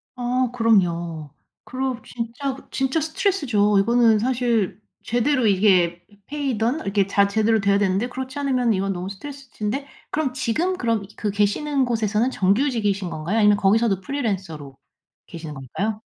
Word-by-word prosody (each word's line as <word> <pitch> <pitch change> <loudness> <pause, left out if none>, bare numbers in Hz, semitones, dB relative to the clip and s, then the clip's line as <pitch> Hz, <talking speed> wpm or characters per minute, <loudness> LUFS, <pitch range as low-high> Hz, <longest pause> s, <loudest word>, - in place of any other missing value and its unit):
아 250 0 0
그럼요. 175 -9 +1 0.3
그럼 255 -1 -3
진짜, 245 +4 -4 0.2
진짜 270 +4 0
스트레스죠. 285 - +1
이거는 230 +1 +4
사실 235 -4 0 0.2
제대로 245 +2 +1
이게 185 -4 +3 0.3
페이든 275 -1 -1
이렇게 195 -1 0
자 200 0 +3
제대로 220 +2 +2
돼야 200 0 +3
되는데 200 +4 0
그렇지 260 +2 -6
않으면 255 -5 +1
이건 195 0 -1
너무 180 +1 -5
스트레스신데 270 +2 -5 0.3
그럼 295 -4 -1
지금 340 +12 -1
그럼 230 - 0
그 210 - -2
계시는 260 +8 +1
곳에서는 225 0 0
정규직이신 205 -3 +1
건가요? 170 +7 -3
아니면 210 -2 +5
거기서도 200 0 +2
프리랜서로 185 - -4 0.5
계시는 160 -2 -8
건가요? 195 - -4
225 Hz, 355 characters per minute, -22 LUFS, 195-255 Hz, 0.5 s, 아니면